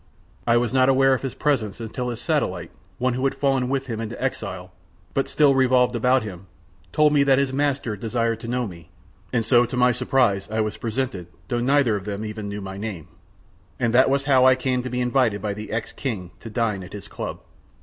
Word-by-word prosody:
I 115 0 +5
was 120 0 0
not 130 0 +4
aware 135 0 +5
of 130 - -1
his 135 -2 -4
presence 120 -9 0
until 120 +2 -4
his 120 - -5
satellite, - - -1 0.3
one 125 0 +1
who 130 +2 -3
had 135 - +1
fallen 135 -3 +1
with 135 0 -1
him 115 -4 -4
into 115 +1 -6
exile 95 -8 -4 0.4
but 135 - 0
still 145 -2 +4
revolved 125 -2 +3
about 125 +1 +3
him, 95 -3 -8 0.4
told 150 -1 +4
me 145 - +4
that 135 -1 +4
his 135 -1 +1
master 140 -5 0
desired 115 +1 -1
to 115 - -8
know 125 +1 -1
me; 85 -5 -10 0.4
and 115 -3 0
so 120 +1 +5
to 120 +1 -4
my 125 0 +5
surprise 120 -5 +1
I 110 +1 -2
was 110 -1 -1
presented 115 -6 -3 0.2
though 120 -2 0
neither 135 -3 +3
of 100 -2 -5
them 105 +1 -4
even 105 -1 -5
knew 100 0 -5
my 95 0 -7
name. 95 -7 -6 0.7
And 120 -2 +1
that 130 +2 +5
was 140 0 +1
how 135 -3 +5
I 130 0 +7
came 130 -1 -1
to 130 - -5
be 125 0 -2
invited 125 -4 +2
by 100 0 -2
the 105 +1 -8
ex 110 +1 -3
King 100 -10 -4
to 115 - -9
dine 110 -3 -1
at 90 +1 -10
his 105 - -8
club. - - -6
120 Hz, 220 wpm, -23 LUFS, 105-130 Hz, 0.7 s, I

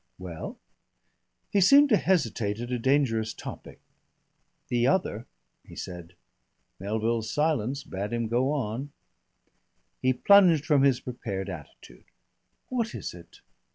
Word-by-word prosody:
"Well?" 90 -3 -7 0.9
He 200 - +3
seemed 280 +9 +7
to 215 - +5
hesitate 115 - 0
at 120 +1 -5
a 125 - -1
dangerous 115 -4 +1
topic. - - -9 0.9
"The 120 -1 +2
other," 125 - 0 0.4
he - - -14
said. 90 -1 -8 0.6
Melville's 110 +3 -1
silence 140 -3 0
bade 100 0 -5
him 115 -1 -1
go 125 +5 +1
on. 135 0 -3 1.1
He 130 - +3
plunged 170 +1 +5
from 150 -4 +3
his 135 -2 +3
prepared 100 -6 -5
attitude. 75 -6 -12 0.6
"What 235 -3 -2
is - - -5
it? - - -15
120 Hz, 120 wpm, -27 LUFS, 105-150 Hz, 1.1 s, seemed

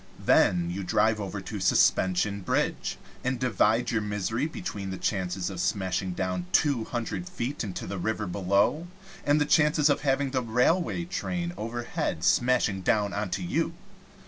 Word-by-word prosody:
Then 85 -1 +4
you 95 +3 -4
drive 105 +3 +2
over 100 -2 -4
to - - -6
Suspension 95 +2 +2
Bridge, 90 - -1 0.3
and 130 -1 -1
divide 115 -2 +2
your 115 -2 +1
misery 105 +6 -1
between 105 - -5
the 95 - -4
chances 95 -1 -2
of 95 - -6
smashing 95 0 -1
down 90 -1 -2
two 140 -7 +2
hundred 120 +9 -4
feet 145 -7 -3
into 95 -5 -5
the 100 -1 -5
river 110 +3 -1
below, 100 - +1 0.4
and 145 +1 +3
the 150 - +2
chances 150 -1 +4
of - - 0
having 135 -1 +1
the 130 -1 0
railway 125 +10 +1
train 175 -1 -3
overhead 115 -7 -3
smashing 110 -1 +2
down 100 +1 +1
onto 100 -2 -2
you. 85 - -1
110 Hz, 155 wpm, -27 LUFS, 95-135 Hz, 0.4 s, Then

